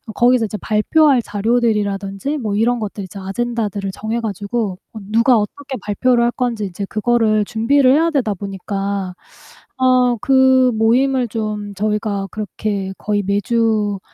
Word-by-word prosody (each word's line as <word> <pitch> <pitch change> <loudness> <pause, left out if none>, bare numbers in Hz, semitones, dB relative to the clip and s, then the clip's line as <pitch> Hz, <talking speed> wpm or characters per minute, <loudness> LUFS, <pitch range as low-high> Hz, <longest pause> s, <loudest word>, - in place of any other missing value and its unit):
거기서 245 -1 +3
이제 210 0 -5
발표할 260 +5 +3
자료들이라든지 210 +2 -1
뭐 215 -6 -2
이런 235 +3 +2
것들 205 -2 -5
이제 185 +2 -11
아젠다들을 205 0 -3
정해 220 +2 -3
가지고 205 -1 -3 0.2
어 220 - -7
누가 230 +2 +4
어떻게 265 +6 -5
발표를 235 +4 +1
할 235 - +3
건지 235 -5 -2
인제 195 +1 -5
그거를 215 -1 +1
준비를 255 +4 +3
해야 325 +3 +3
되다 245 -9 0
보니까 195 -1 -4 0.6
어 255 -2 +3
그 260 -1 +4
모임을 245 +3 +2
좀 210 -2 -4
저희가 210 -1 -1
그렇게 205 -2 -4
거의 205 -1 -1
매주 210 0 0
220 Hz, 320 characters per minute, -18 LUFS, 205-245 Hz, 0.6 s, 누가